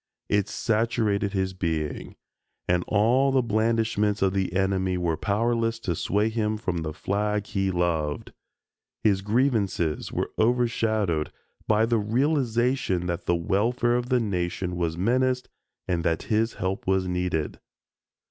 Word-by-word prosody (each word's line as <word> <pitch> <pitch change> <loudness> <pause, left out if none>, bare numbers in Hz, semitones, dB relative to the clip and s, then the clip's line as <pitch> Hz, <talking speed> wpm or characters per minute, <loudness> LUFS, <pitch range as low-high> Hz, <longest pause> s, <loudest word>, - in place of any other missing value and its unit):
It 105 -1 +1
saturated 110 -3 0
his 95 -1 -1
being 80 -4 -3 0.5
and 90 0 +2
all 120 +6 +3
the 130 -1 +3
blandishments 110 -2 +1
of 95 -1 +2
the 95 -3 0
enemy 95 -1 +1
were 85 -2 0
powerless 115 +5 0
to 90 -6 -1
sway 105 +6 +1
him 110 -1 -1
from 95 -6 -2
the 80 -1 -3
flag 105 +4 -1
he 95 -2 -1
loved. 85 -5 -1 0.7
His 100 -3 +3
grievances 105 - 0
were - - -2
overshadowed 110 -8 +1 0.4
by 110 +1 +4
the 115 -1 +1
realization 120 - +1
that 85 0 -3
the 85 - +3
welfare 115 +8 +1
of 125 0 -2
the 125 -1 +3
nation 90 -4 -2
was 85 -2 -1
menaced 125 +6 +1 0.4
and 85 -2 0
that 85 -1 0
his 110 +1 +1
help 95 +1 -3
was 95 -1 +2
needed. 90 -4 -2
100 Hz, 140 wpm, -26 LUFS, 90-115 Hz, 0.7 s, by